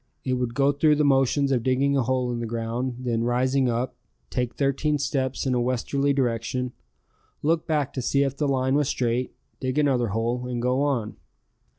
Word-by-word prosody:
It 130 Hz, -, 0 dB
would 125 Hz, -2 st, -2 dB
go 140 Hz, 0 st, +4 dB
through 150 Hz, +2 st, +3 dB
the 150 Hz, 0 st, +2 dB
motions 135 Hz, 0 st, +3 dB
of 125 Hz, -3 st, +2 dB
digging 130 Hz, +3 st, +2 dB
a 135 Hz, -, +3 dB
hole 125 Hz, 0 st, 0 dB
in 120 Hz, -, -3 dB
the 115 Hz, -, -3 dB
ground, 115 Hz, +2 st, -3 dB
then 115 Hz, -2 st, 0 dB
rising 130 Hz, +2 st, +2 dB
up, 120 Hz, +2 st, -2 dB, 0.4 s
take 125 Hz, -1 st, -2 dB
thirteen 145 Hz, +2 st, +1 dB
steps 135 Hz, -2 st, -1 dB
in 130 Hz, -, +1 dB
a 125 Hz, -, +1 dB
westerly 130 Hz, +3 st, 0 dB
direction, 125 Hz, -1 st, -1 dB, 0.7 s
look 160 Hz, +2 st, +1 dB
back 150 Hz, -4 st, 0 dB
to 130 Hz, -, -3 dB
see 140 Hz, +3 st, +2 dB
if 135 Hz, -1 st, -1 dB
the 145 Hz, +1 st, 0 dB
line 130 Hz, -1 st, +1 dB
was 145 Hz, -1 st, +2 dB
straight, 125 Hz, 0 st, -1 dB, 0.2 s
dig 130 Hz, +2 st, -2 dB
another 135 Hz, -5 st, +2 dB
hole, 115 Hz, +4 st, -1 dB
and 125 Hz, -1 st, -3 dB
go 125 Hz, +3 st, +1 dB
on. 130 Hz, -7 st, -1 dB
130 Hz, 195 wpm, -25 LUFS, 120-140 Hz, 0.7 s, go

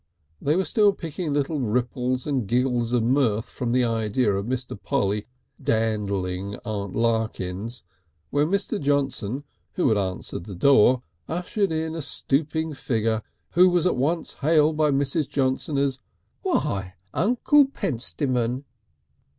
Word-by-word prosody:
They 150 Hz, +2 st, +2 dB
were 190 Hz, +1 st, +1 dB
still 210 Hz, -2 st, +4 dB
picking 165 Hz, -2 st, -4 dB
little 145 Hz, +2 st, 0 dB
ripples 125 Hz, +2 st, -1 dB
and 135 Hz, -8 st, -1 dB
giggles 120 Hz, 0 st, +1 dB
of 120 Hz, -2 st, +2 dB
mirth 115 Hz, -3 st, +2 dB
from 125 Hz, -2 st, -4 dB
the 125 Hz, +1 st, +3 dB
idea 115 Hz, -1 st, +1 dB
of 100 Hz, +2 st, -2 dB
Mr. 130 Hz, 0 st, -3 dB
Polly 100 Hz, +1 st, 0 dB, 0.3 s
dandling 100 Hz, -3 st, -1 dB
Aunt 100 Hz, -4 st, -4 dB
Larkins 110 Hz, -1 st, -1 dB, 0.5 s
when 145 Hz, +1 st, +2 dB
Mr. 200 Hz, +3 st, 0 dB
Johnson, 140 Hz, -3 st, 0 dB, 0.3 s
who 180 Hz, -, +2 dB
had 110 Hz, -2 st, +3 dB
answered 95 Hz, -2 st, -4 dB
the 100 Hz, -, -7 dB
door, 125 Hz, +3 st, +5 dB, 0.3 s
ushered 180 Hz, +3 st, -1 dB
in 160 Hz, 0 st, -1 dB
a 165 Hz, -, -4 dB
stooping 155 Hz, +3 st, -1 dB
figure, 115 Hz, -4 st, 0 dB, 0.3 s
who 180 Hz, +1 st, +6 dB
was 175 Hz, -1 st, +2 dB
at 180 Hz, -, +3 dB
once 155 Hz, +7 st, 0 dB
hailed 155 Hz, +1 st, +4 dB
by 155 Hz, 0 st, +3 dB
Mrs. 140 Hz, +2 st, 0 dB
Johnson 135 Hz, +2 st, 0 dB
as 140 Hz, -1 st, 0 dB, 0.4 s
"Why! 100 Hz, -, -1 dB, 0.2 s
Uncle 250 Hz, -, +4 dB
Pentstemon!" 130 Hz, -, -1 dB
130 Hz, 135 wpm, -25 LUFS, 110-155 Hz, 0.5 s, who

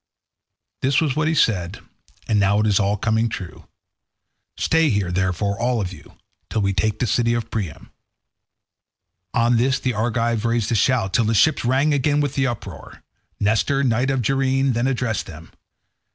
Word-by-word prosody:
This 130 Hz, +1 st, +2 dB
was 150 Hz, -5 st, 0 dB
what 155 Hz, 0 st, 0 dB
he 160 Hz, -, +1 dB
said, 95 Hz, -, +1 dB, 0.5 s
and 105 Hz, -2 st, +2 dB
now 100 Hz, +1 st, +3 dB
it 105 Hz, -, +1 dB
is 105 Hz, -2 st, +2 dB
all 100 Hz, 0 st, +1 dB
coming 110 Hz, +2 st, 0 dB
true. 95 Hz, -4 st, -8 dB, 0.9 s
Stay 160 Hz, -1 st, +2 dB
here, 100 Hz, -6 st, 0 dB
therefore, 95 Hz, +2 st, -1 dB
all 120 Hz, 0 st, 0 dB
of 95 Hz, -3 st, -3 dB
you, 80 Hz, -, -16 dB, 0.3 s
till 110 Hz, -, -1 dB
we 100 Hz, 0 st, +1 dB
take 110 Hz, +2 st, 0 dB
the -, -, -1 dB
city 115 Hz, +1 st, +1 dB
of 115 Hz, -, -4 dB
Priam." 100 Hz, -9 st, -5 dB, 1.4 s
On 115 Hz, +1 st, +3 dB
this 130 Hz, +3 st, +1 dB
the 130 Hz, -1 st, -1 dB
Argives 115 Hz, 0 st, -1 dB
raised 115 Hz, -2 st, 0 dB
a -, -, +2 dB
shout, 110 Hz, -3 st, +1 dB
till 115 Hz, -, +2 dB
the 110 Hz, +1 st, +1 dB
ships 155 Hz, +8 st, +3 dB
rang 135 Hz, +5 st, +2 dB
again 145 Hz, +1 st, +1 dB
with 145 Hz, -2 st, -1 dB
the 135 Hz, -1 st, +1 dB
uproar. 105 Hz, -, -8 dB, 0.4 s
Nestor, 110 Hz, +7 st, +1 dB
knight 125 Hz, +1 st, +1 dB
of 135 Hz, -2 st, 0 dB
Gerene, 135 Hz, +2 st, +1 dB
then 120 Hz, +2 st, 0 dB
addressed 125 Hz, -5 st, -2 dB
them. 80 Hz, -2 st, -12 dB
115 Hz, 175 wpm, -21 LUFS, 105-130 Hz, 1.4 s, now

